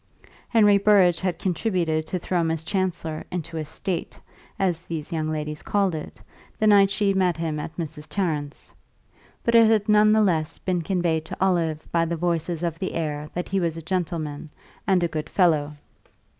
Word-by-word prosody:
Henry 205 Hz, -3 st, +5 dB
Burrage 195 Hz, -4 st, +4 dB
had 180 Hz, -3 st, -1 dB
contributed 175 Hz, -4 st, -1 dB
to 185 Hz, -, -2 dB
throw 175 Hz, 0 st, -1 dB
Miss 160 Hz, -1 st, -1 dB
Chancellor 175 Hz, -4 st, -2 dB
into 170 Hz, -2 st, -5 dB
a 155 Hz, -, -2 dB
"state," 175 Hz, +4 st, -5 dB, 0.4 s
as 180 Hz, -4 st, 0 dB
these 165 Hz, -1 st, -6 dB
young 155 Hz, -1 st, -1 dB
ladies 150 Hz, -1 st, -4 dB
called 200 Hz, -3 st, +1 dB
it, 155 Hz, -, -7 dB, 0.4 s
the 220 Hz, -, 0 dB
night 200 Hz, -2 st, +6 dB
she 200 Hz, 0 st, +1 dB
met 180 Hz, -3 st, +1 dB
him 160 Hz, -2 st, -2 dB
at 155 Hz, -, -6 dB
Mrs. 155 Hz, -3 st, -5 dB
Tarrant's; 150 Hz, -7 st, -3 dB, 0.7 s
but 235 Hz, -, +1 dB
it 230 Hz, -1 st, +7 dB
had 215 Hz, -1 st, +2 dB
none 210 Hz, 0 st, +5 dB
the 220 Hz, 0 st, +4 dB
less 165 Hz, -4 st, 0 dB
been 180 Hz, -2 st, -1 dB
conveyed 165 Hz, -3 st, 0 dB
to -, -, -7 dB
Olive 170 Hz, -5 st, 0 dB
by 170 Hz, -1 st, +2 dB
the 170 Hz, +1 st, -2 dB
voices 170 Hz, 0 st, -1 dB
of 165 Hz, -1 st, -2 dB
the 190 Hz, -, -3 dB
air 150 Hz, -2 st, -3 dB
that 180 Hz, -, -3 dB
he 195 Hz, -, +1 dB
was 165 Hz, -2 st, -1 dB
a -, -, -5 dB
gentleman 160 Hz, -4 st, -3 dB, 0.4 s
and 185 Hz, -3 st, +3 dB
a -, -, +3 dB
good 155 Hz, -2 st, -5 dB
fellow. 155 Hz, -6 st, +2 dB
170 Hz, 185 wpm, -24 LUFS, 160-190 Hz, 0.7 s, it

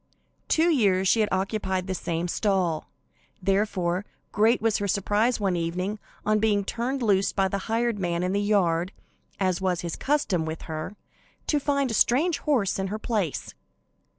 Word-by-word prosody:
Two 320 Hz, +2 st, +3 dB
years 195 Hz, -, +3 dB
she 225 Hz, -, +4 dB
had 215 Hz, -1 st, +2 dB
occupied 190 Hz, -1 st, -1 dB
the 190 Hz, -, -2 dB
same 170 Hz, -1 st, -2 dB
stall; 180 Hz, -4 st, 0 dB, 0.5 s
therefore, 190 Hz, -2 st, 0 dB, 0.3 s
great 220 Hz, +3 st, +3 dB
was 225 Hz, -1 st, +1 dB
her 205 Hz, -, -1 dB
surprise 210 Hz, +5 st, +1 dB
one 195 Hz, -3 st, +1 dB
evening, 180 Hz, +5 st, -2 dB, 0.3 s
on 215 Hz, 0 st, +3 dB
being 205 Hz, -2 st, +2 dB
turned 250 Hz, +4 st, -2 dB
loose 200 Hz, -3 st, +3 dB
by 195 Hz, -1 st, +1 dB
the 195 Hz, +1 st, -2 dB
hired 230 Hz, -1 st, 0 dB
man 175 Hz, -1 st, -1 dB
in 180 Hz, +1 st, 0 dB
the 200 Hz, -, +1 dB
yard, 185 Hz, -4 st, +1 dB, 0.5 s
as 185 Hz, -2 st, 0 dB
was 185 Hz, -2 st, 0 dB
his 170 Hz, -2 st, -4 dB
custom 265 Hz, -, 0 dB
with 160 Hz, 0 st, -5 dB
her, 160 Hz, +5 st, -5 dB, 0.5 s
to 295 Hz, -, +1 dB
find 280 Hz, -2 st, 0 dB
a -, -, -2 dB
strange 285 Hz, +9 st, +3 dB
horse 235 Hz, -11 st, +1 dB
in 190 Hz, -, -1 dB
her 210 Hz, +3 st, -3 dB
place. 215 Hz, -, -2 dB
200 Hz, 170 wpm, -26 LUFS, 180-220 Hz, 0.5 s, she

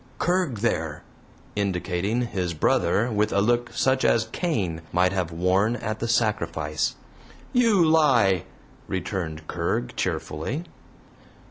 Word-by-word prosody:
"Kerg, 175 Hz, -, 0 dB
there" 80 Hz, -9 st, -1 dB, 0.5 s
indicating 100 Hz, +3 st, -1 dB
his 90 Hz, -7 st, -2 dB
brother 105 Hz, +8 st, +2 dB
with 105 Hz, 0 st, +1 dB
a 100 Hz, -, +2 dB
look 120 Hz, +3 st, +1 dB
such 130 Hz, 0 st, +1 dB
as 115 Hz, -1 st, +3 dB
Cain 95 Hz, -, -1 dB
might 90 Hz, +2 st, +3 dB
have 90 Hz, -3 st, -1 dB
worn 95 Hz, +7 st, +2 dB
at 110 Hz, -2 st, -4 dB
the 115 Hz, -, -2 dB
sacrifice. 85 Hz, -10 st, 0 dB, 0.6 s
"You 225 Hz, -8 st, +4 dB
lie!" 125 Hz, -, +4 dB, 0.4 s
returned 85 Hz, -4 st, -4 dB
Kerg, -, -, -2 dB
cheerfully. 115 Hz, -, -2 dB
105 Hz, 115 wpm, -25 LUFS, 90-120 Hz, 0.6 s, You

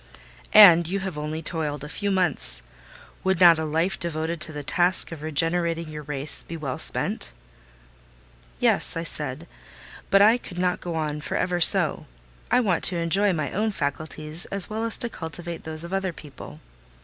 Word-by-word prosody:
"And 175 Hz, -6 st, +8 dB
you 195 Hz, +3 st, -3 dB
have 190 Hz, -4 st, -5 dB
only 155 Hz, +2 st, -5 dB
toiled 150 Hz, -3 st, -3 dB
a -, -, -6 dB
few 200 Hz, +6 st, -4 dB
months! 160 Hz, -, -1 dB, 0.6 s
Would 190 Hz, -2 st, 0 dB
not 170 Hz, -3 st, +7 dB
a 160 Hz, -, -2 dB
life 165 Hz, +5 st, -1 dB
devoted 165 Hz, -1 st, -4 dB
to 155 Hz, -, +3 dB
the 145 Hz, -1 st, -7 dB
task 175 Hz, +5 st, +2 dB
of 165 Hz, -3 st, -8 dB
regenerating 165 Hz, +2 st, -1 dB
your 150 Hz, 0 st, -7 dB
race 145 Hz, 0 st, -3 dB
be 165 Hz, -, -8 dB
well 140 Hz, -5 st, -5 dB
spent?" -, -, 0 dB, 1.3 s
"Yes," -, -, +2 dB
I 165 Hz, -, -3 dB
said; 150 Hz, -1 st, -5 dB, 0.6 s
"but 195 Hz, -, +5 dB
I 225 Hz, +4 st, +4 dB
could 180 Hz, -6 st, -11 dB
not 180 Hz, 0 st, -1 dB
go 175 Hz, -2 st, -5 dB
on 150 Hz, -2 st, -3 dB
for -, -, -4 dB
ever 180 Hz, -1 st, -1 dB
so: -, -, +5 dB, 0.4 s
I 250 Hz, -, +3 dB
want 190 Hz, -7 st, 0 dB
to 180 Hz, -, +3 dB
enjoy 190 Hz, +5 st, +1 dB
my 155 Hz, -5 st, -3 dB
own 215 Hz, +3 st, -1 dB
faculties 155 Hz, -1 st, -2 dB
as 200 Hz, +1 st, +2 dB
well 220 Hz, +1 st, -3 dB
as 230 Hz, -, -2 dB
to 235 Hz, -, -2 dB
cultivate 170 Hz, -4 st, -8 dB
those 160 Hz, 0 st, 0 dB
of 170 Hz, +2 st, -8 dB
other 190 Hz, -2 st, -2 dB
people. 140 Hz, -, -12 dB
165 Hz, 180 wpm, -24 LUFS, 155-185 Hz, 1.3 s, And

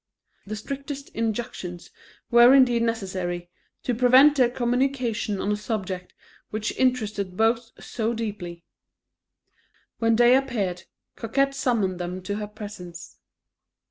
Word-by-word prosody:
The 215 Hz, -, -4 dB
strictest 275 Hz, +5 st, -6 dB
injunctions 210 Hz, -6 st, -4 dB, 0.4 s
were 240 Hz, +2 st, +8 dB
indeed 245 Hz, -3 st, +5 dB
necessary, 185 Hz, -6 st, -2 dB, 0.3 s
to 250 Hz, -, 0 dB
prevent 255 Hz, +5 st, +6 dB
their 255 Hz, -4 st, +4 dB
communicating 245 Hz, -4 st, -1 dB
on 205 Hz, -, -1 dB
a -, -, +2 dB
subject 195 Hz, -4 st, -4 dB, 0.3 s
which 215 Hz, +1 st, -3 dB
interested 210 Hz, -7 st, 0 dB
both 230 Hz, +1 st, +2 dB
so 225 Hz, -1 st, -2 dB
deeply. 195 Hz, -7 st, -5 dB, 1.4 s
When 230 Hz, -1 st, +3 dB
day 240 Hz, +2 st, +6 dB
appeared, 205 Hz, -10 st, -1 dB, 0.3 s
Coquette 275 Hz, +4 st, 0 dB
summoned 220 Hz, -9 st, 0 dB
them 180 Hz, +1 st, -5 dB
to 205 Hz, +2 st, -3 dB
her 210 Hz, -1 st, -4 dB
presence. 200 Hz, -5 st, -10 dB
225 Hz, 115 wpm, -25 LUFS, 190-245 Hz, 1.4 s, were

